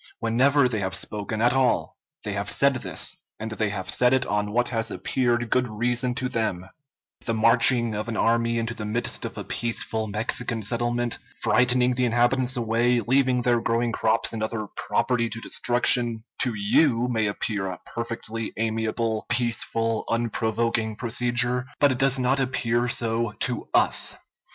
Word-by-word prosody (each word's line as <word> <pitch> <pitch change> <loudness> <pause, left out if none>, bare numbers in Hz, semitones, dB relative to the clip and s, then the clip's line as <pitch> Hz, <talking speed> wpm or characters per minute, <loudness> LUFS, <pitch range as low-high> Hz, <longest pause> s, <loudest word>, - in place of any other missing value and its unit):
Whenever 130 +4 +3
they 115 -4 -2
have 95 -1 -2
spoken 110 +1 -2
at 120 +1 +4
all 125 - +1 0.3
they - - -4
have - - -3
said - - +3
this; - - 0 0.2
and 110 0 -5
they 110 -1 -1
have 95 -2 -5
said 125 +7 +3
it 130 -1 0
on 105 -1 -2
what 120 +2 +1
has 115 -3 -2
appeared 120 +4 -1
good 125 -1 +2
reason 120 +3 -1
to 130 0 -2
them; 100 -7 -3 0.6
the 115 - 0
marching 115 +1 +4
of 105 +2 -4
an 110 - -3
army 115 0 +1
into 115 0 -2
the 115 - -7
midst 110 +3 -1
of - - -7
a - - -5
peaceful 110 -1 -2
Mexican 110 +2 -2
settlement, 120 +2 -1 0.2
frightening 125 0 +3
the 125 0 0
inhabitants 120 +2 +1
away, 120 +1 +1
leaving 125 +1 +1
their 120 -1 +2
growing 115 +1 0
crops 110 +1 +1
and 110 - -4
other 110 0 -3
property 115 0 0
to 115 +1 -6
destruction, 120 -1 +2 0.2
to 125 -3 0
you 115 +4 +2
may 110 -3 0
appear 100 -1 -2
a 90 -2 -6
perfectly 115 -1 -5
amiable, 110 0 -2
peaceful, 115 -1 0
unprovoking 115 -1 -1
procedure; 120 +2 -1
but 145 -1 +4
it 130 - -3
does 135 -1 +3
not 130 +2 +1
appear 125 -2 0
so 115 -2 -1
to 125 -2 -2
us. - - +3
115 Hz, 165 wpm, -24 LUFS, 110-125 Hz, 0.6 s, at